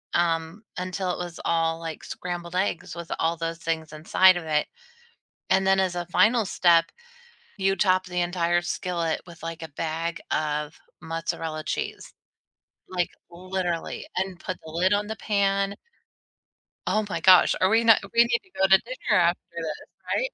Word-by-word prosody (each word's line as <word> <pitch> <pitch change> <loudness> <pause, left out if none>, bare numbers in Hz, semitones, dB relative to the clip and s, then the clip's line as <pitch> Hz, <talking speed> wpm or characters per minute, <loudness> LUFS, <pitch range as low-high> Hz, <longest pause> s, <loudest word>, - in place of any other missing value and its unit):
um, 165 +3 0
until 185 0 -2
it - - -3
was 175 -1 -8
all 165 0 +1
like 165 -1 -6
scrambled 175 -1 -6
eggs 180 -3 -1
with 170 -1 -8
all 165 +1 +1
those 165 0 -3
things 160 -1 -3
inside 185 +4 +5
of 165 - -6
it. 150 -1 +1 0.9
And 190 0 +4
then 190 0 +4
as 185 -2 +1
a 175 - -2
final 220 +4 +3
step, 170 -3 +4 0.7
you 195 0 +2
top 185 -2 +3
the 180 -1 -2
entire 175 0 +1
skillet 175 -2 -2
with 170 -2 -13
like 165 0 -6
a 160 - -5
bag 165 +1 -3
of 150 0 -1 0.3
mozzarella 160 -1 -3
cheese, - - -4 0.8
like 180 -2 0 0.2
literally, 180 -1 -3
and 190 -1 -2
put 185 - -5
the 160 - -8
lid 185 +4 +2
on 205 0 0
the 220 - -4
pan. 200 -1 +1 1.1
Oh 215 0 +1
my 165 - -2
gosh 185 +2 +6
are 185 - +4
we 225 +2 +4
not 225 -1 +7
we 235 - +6
need 235 0 +1
to 375 - -26
go - - +3
to 190 0 +8
dinner - - 0
after - - +3 0.2
this - - -3 0.5
right? - - 0
175 Hz, 170 wpm, -25 LUFS, 165-190 Hz, 1.1 s, to